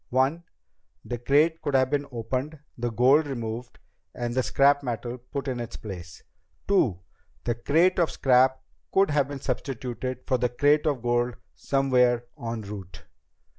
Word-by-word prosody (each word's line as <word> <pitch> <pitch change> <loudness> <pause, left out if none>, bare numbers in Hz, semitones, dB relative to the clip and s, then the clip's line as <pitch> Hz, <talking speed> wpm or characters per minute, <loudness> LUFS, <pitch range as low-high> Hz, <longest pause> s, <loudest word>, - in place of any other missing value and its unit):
One: 135 +7 +1 0.6
the 120 -1 -4
crate 150 +6 +3
could 145 - -1
have 130 0 +3
been 145 -1 0
opened, 130 +6 -3 0.2
the 120 0 -2
gold 130 +7 +4
removed, 120 -2 -5 0.4
and 120 -1 -3
the 130 - +2
scrap 140 +2 +3
metal 120 -1 -4
put 135 +3 -6
in 125 -2 -2
its 120 -1 -6
place. 90 -5 -9 0.4
Two: 125 - +2 0.4
the 120 - 0
crate 165 +11 +2
of 170 - +3
scrap 130 0 +3 0.3
could 195 -3 +3
have 145 -2 +2
been 140 -2 -7
substituted 130 -1 -4
for 130 -3 +1
the 125 +1 +1
crate 145 +5 +3
of 135 -5 0
gold 120 0 +1 0.2
somewhere 125 -3 +2 0.2
en 115 -1 -3
route." 100 -3 -9
130 Hz, 155 wpm, -26 LUFS, 120-140 Hz, 0.6 s, gold